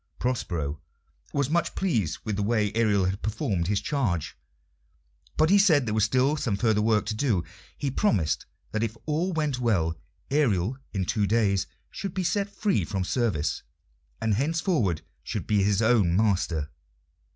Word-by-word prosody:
Prospero 80 - -2 0.5
was 140 -3 0
much 170 +1 0
pleased 110 - 0
with 110 -2 -2
the 105 - -2
way 105 -1 +1
Ariel 105 -4 +2
had 95 +2 -2
performed 105 - -1
his 100 0 +1
charge, 105 - -1 1.0
but 155 +3 +4
he 200 - +7
said 160 -9 +5
there 110 - -2
was 110 -1 +3
still 130 +6 +2
some 115 -9 -1
further 110 -1 +2
work 110 -1 +2
to 110 - -2
do. 110 -6 +1 0.3
He 140 - -2
promised 100 - +1 0.2
that 110 - -1
if 115 0 -2
all 160 +5 0
went 150 -6 -1
well 90 -9 +1 0.4
Ariel 125 - +1
in 95 -3 -1
two 105 +2 +1
days 100 -3 +2 0.2
should 195 -2 -5
be 190 - 0
set 200 +4 0
free 200 - 0
from 95 +2 -2
service, 100 - 0 0.6
and 110 -1 +1
henceforward 145 - 0 0.2
should 90 - -4
be 105 -2 +2
his 100 +2 +2
own 110 -7 +3
master. 90 -8 +1
110 Hz, 160 wpm, -27 LUFS, 95-140 Hz, 1.0 s, he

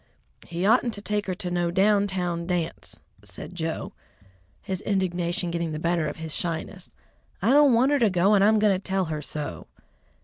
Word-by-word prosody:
"He 175 +2 -3
oughtn't 235 +2 +3
to 205 - -7
take 210 -1 -1
her 185 - -2
to 180 0 -5
no 175 -1 0
down 200 +3 +3
town 175 -3 -2
dance," 175 -2 -3 0.2
said - - -9
Joe, 165 -2 -4 0.7
his 190 0 -4
indignation 180 -2 -1
getting 170 -2 -2
the - - -3
better 170 0 0
of 145 - -5
his 160 -1 -5
shyness. 175 +2 -3 0.5
"I 220 +7 +2
don't 285 -2 +6
want 255 +4 +3
her 290 - +3
to 225 -4 +4
go, 190 +3 +3
and 200 -1 +5
I'm 215 +2 +5
going 210 -1 +4
to 185 - -1
tell 190 0 -1
her 155 -2 -4
so." 150 0 -6
180 Hz, 195 wpm, -25 LUFS, 170-205 Hz, 0.7 s, don't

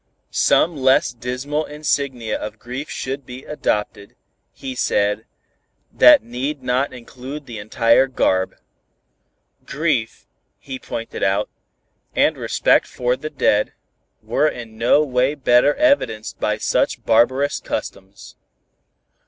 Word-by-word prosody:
Some 170 0 +3
less 130 -2 +3
dismal 130 +5 -3
insignia 140 -6 -2
of 105 +1 -6
grief 125 +6 -7
should 135 +2 -4
be 125 +2 -10
adopted, 105 -8 -3 0.4
he 130 - -7
said, 105 -3 0 0.7
that 125 -3 +7
need 130 +4 -4
not 125 +2 0
include 130 +4 -9
the 115 -4 -8
entire 115 +4 +3
garb. 95 -7 0 1.1
Grief, 135 -5 -2 0.3
he 130 -2 -8
pointed 115 -2 -6
out, 95 +1 +1 0.6
and - - +3
respect - - +2
for 125 0 -1
the 155 +4 -6
dead, 105 -7 +1 0.5
were 155 - +1
in 115 -6 -6
no 120 +6 +3
way 130 +1 +1
better 130 +1 +3
evidenced 280 - +1
by - - 0
such - - 0
barbarous 130 +5 +3
customs. 95 +1 -7
125 Hz, 115 wpm, -20 LUFS, 115-140 Hz, 1.1 s, that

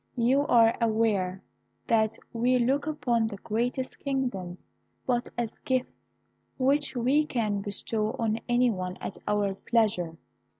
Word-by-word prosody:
You 260 +5 +3
are 230 -1 +5
aware 215 -5 +1 0.4
that 220 -1 +2 0.2
we 245 +2 +3
look 270 +5 +1
upon 245 -7 +1
the 205 -2 -6
greatest 245 +5 -2
kingdoms 245 -11 -2 0.4
but 245 -1 0
as 235 -2 -1
gifts 255 -1 -1 0.6
which 275 +2 +2
we 260 +5 +3
can 215 -6 0
bestow 215 +2 -2
on 225 -1 0
any 240 0 +4
one 185 -2 -4
at - - -6
our 205 -1 +1
pleasure. 195 -6 0
230 Hz, 130 wpm, -28 LUFS, 210-250 Hz, 0.6 s, are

